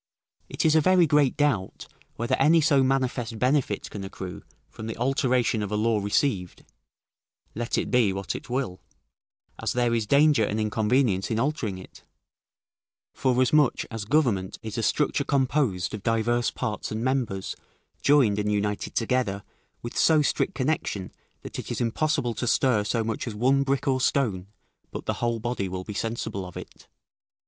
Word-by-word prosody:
It - - -2
is 155 - +5
a 160 - +5
very 185 +2 +5
great 145 -4 +2
doubt, 135 -11 0 0.3
whether 120 +1 -2
any 155 +5 +5
so 145 -3 +4
manifest 130 -3 0
benefit 125 -4 0
can 100 - -6
accrue 95 -1 -7 0.3
from 110 - -9
the 115 - -5
alteration 125 -3 +1
of 105 -1 -4
a - - 0
law 110 0 +1
received, 100 -2 -1 0.9
let 120 +1 -2
it - - -2
be 120 -5 +3
what 95 0 -3
it - - -8
will, 120 -8 -3 0.8
as - - -1
there 120 -1 +1
is 115 -2 0
danger 145 -1 +4
and 105 +1 -1
inconvenience 110 -1 +1
in 110 - -1
altering 120 -7 -1
it; 95 - -13 1.1
forasmuch 130 +2 +2
as 115 -3 -5
government 115 -9 +1
is 110 -1 -6
a 115 - -1
structure 145 +5 +1
composed 130 - 0
of 105 - -5
divers 120 +2 +1
parts 110 -5 -4
and 110 +2 -3
members 125 -8 -1 0.5
joined 130 -8 +4
and 105 0 0
united 105 0 -2
together, 115 -4 0 0.4
with 120 - -6
so 155 -2 +4
strict 180 - 0
connection, 130 -9 -2 0.3
that - - -7
it - - -7
is - - -3
impossible 125 +1 0
to 120 - -3
stir 120 -4 +3
so 115 +3 -1
much 115 +2 -3
as 110 - -4
one 130 +5 +3
brick 140 0 -1
or 130 -1 +2
stone, 105 -10 0 0.4
but - - -7
the - - 0
whole 120 -1 0
body 115 -4 -2
will 95 0 -5
be 105 - -7
sensible 110 -2 -3
of 90 -1 -9
it. - - -11
120 Hz, 170 wpm, -26 LUFS, 105-135 Hz, 1.1 s, is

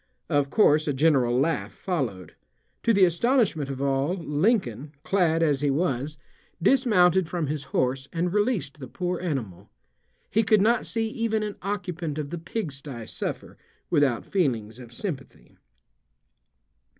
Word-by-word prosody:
Of 145 -3 +2
course 155 -5 +4
a 145 - +1
general 130 -4 +3
laugh 155 +2 0
followed. 115 - -3 0.5
To 230 - +3
the 200 -4 +6
astonishment 180 - +1
of 135 0 -4
all 140 +5 +1
Lincoln, 150 - 0
clad 165 -4 +2
as 145 -4 +2
he 145 - +2
was, 145 -1 -1 0.4
dismounted 190 - +4
from 175 -3 -1
his 145 -1 -3
horse 130 +1 -1
and 175 +1 -1
released 205 - 0
the 130 - -7
poor 180 +4 -3
animal. 110 - -4 0.6
He 225 - +3
could 220 -1 +4
not 225 +4 +2
see 225 -1 -1
even 220 -1 -1
an 210 -1 -4
occupant 180 -6 -3
of 145 -2 -4
the 175 - -4
pigsty 145 - -5
suffer - - -6 0.3
without 145 -7 +2
feelings 120 - -1
of 120 -2 -11
sympathy. 135 - -7
155 Hz, 140 wpm, -26 LUFS, 135-190 Hz, 0.6 s, the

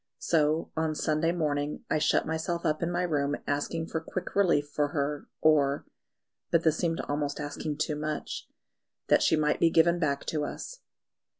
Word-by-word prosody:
So 155 0 +1
on 160 -1 0
Sunday 155 +2 +1
morning 150 -3 -2
I 155 - +1
shut 150 - +2
myself 160 +2 -2
up 155 -1 +1
in 170 - 0
my 175 +1 0
room 145 -4 0
asking 145 +3 -1
for 160 -1 -3
quick 180 +2 -5
relief 170 -7 +3
for 145 0 0
her, 145 0 -2
or 145 -3 +3 0.6
but 170 0 +3
this 160 -1 +3
seemed 165 -2 0
almost 145 0 -2
asking 150 0 -4
too 155 0 -1
much 150 0 -4 0.6
that - - +5
she - - +4
might 150 -1 +1
be 165 - +5
given 170 +1 +4
back 140 -4 0
to 150 -2 -1
us. - - -6
155 Hz, 175 wpm, -29 LUFS, 145-165 Hz, 0.6 s, that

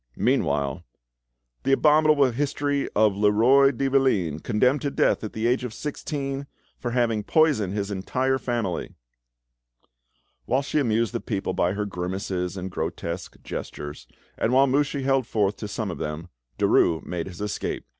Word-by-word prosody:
Meanwhile—— 70 -1 0 0.8
"The 135 - +2
abominable 150 -2 +4
history 145 +2 -1
of 105 -1 +4
Leroi 110 +7 +5
de 135 +1 -1
Valine, 110 - +2
condemned 125 - +1
to 145 - -1
death - - +1
at 110 - -5
the 110 +1 -2
age 125 +2 +2
of 125 -3 -5
sixteen 140 -2 -4 0.3
for 120 - -3
having 120 -3 +1
poisoned 120 - +2
his 100 -1 -2
entire 130 +7 0
family!" 115 -9 -3 1.5
Whilst 135 +2 +1
she 155 - +2
amused 115 -3 +1
the 120 - -2
people 100 -4 -2
by 90 +2 +1
her 105 +1 -2
grimaces 90 -1 -3
and 95 0 -5
grotesque 85 0 -4
gestures, 75 0 -7 0.3
and 115 - +1
while 135 +2 +5
Mouchy 140 +1 0
held 135 -2 +1
forth 105 -2 +1
to 105 - -5
some 105 -1 -3
of - - -7
them, 75 +3 -5 0.3
Derues 80 -1 +3
made 85 -1 -4
his 90 -2 -9
escape. 105 0 -3
115 Hz, 155 wpm, -25 LUFS, 95-135 Hz, 1.5 s, Leroi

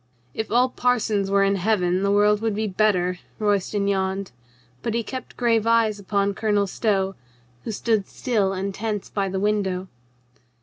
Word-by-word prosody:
"If 220 - -4
all 250 +3 +4
parsons 220 -6 +1
were 200 0 +3
in 195 0 +2
Heaven, 185 -2 +1
the 200 - +1
world 205 +1 +3
would 225 -2 0
be 220 +1 -1
better," 185 -3 +1 0.2
Royston 205 -1 0
yawned; 190 0 -1 0.5
but 230 - -2
he 235 - 0
kept 255 +3 -7
grave 230 -2 +2
eyes 225 -2 +3
upon 200 0 0
Colonel 205 0 +1
Stow, 195 -1 0 0.5
who - - -2
stood 215 -2 0
still 215 -7 0
and 195 +1 -3
tense 210 0 -4
by 195 -2 -1
the 190 0 -2
window. 190 -3 0
205 Hz, 165 wpm, -23 LUFS, 195-220 Hz, 0.5 s, all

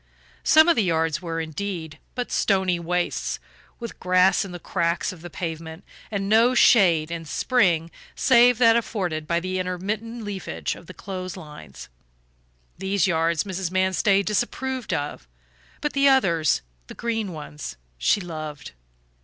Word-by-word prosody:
Some 315 +1 +6
of 340 - +5
the - - +3
yards 165 -4 0
were, 165 -2 -3
indeed, 160 0 -5 0.2
but 245 -1 -3
stony 190 -3 +1
wastes, 175 +1 -1 0.4
with 235 -2 -7
grass 185 +1 +3
in 195 - -8
the 175 - -6
cracks 170 +1 -1
of 170 - -14
the 175 - -8
pavement 165 +1 -6 0.3
and 200 -2 -2
no 230 +4 +4
shade 170 -10 +5
in 165 -1 -4
spring 170 - +1 0.2
save 245 -2 +5
that 230 -2 +6
afforded 180 -9 -2
by 170 0 +1
the 185 +1 -3
intermittent 210 +6 -3
leafage 200 -3 -4
of 170 - -13
the 185 - -10
clothes 185 -1 -6
lines. 150 - -11 0.9
These 195 +1 +1
yards 165 -2 +1
Mrs. 190 -3 -3
Manstey 190 +2 +2
disapproved 250 +4 -2
of, 145 - -3 0.5
but 295 - -1
the 275 0 +4
others, 170 - +3 0.2
the - - -10
green 225 -4 -2
ones, 150 -2 -8 0.2
she 60 - +3
loved. 155 -5 -7
185 Hz, 145 wpm, -24 LUFS, 165-215 Hz, 0.9 s, Some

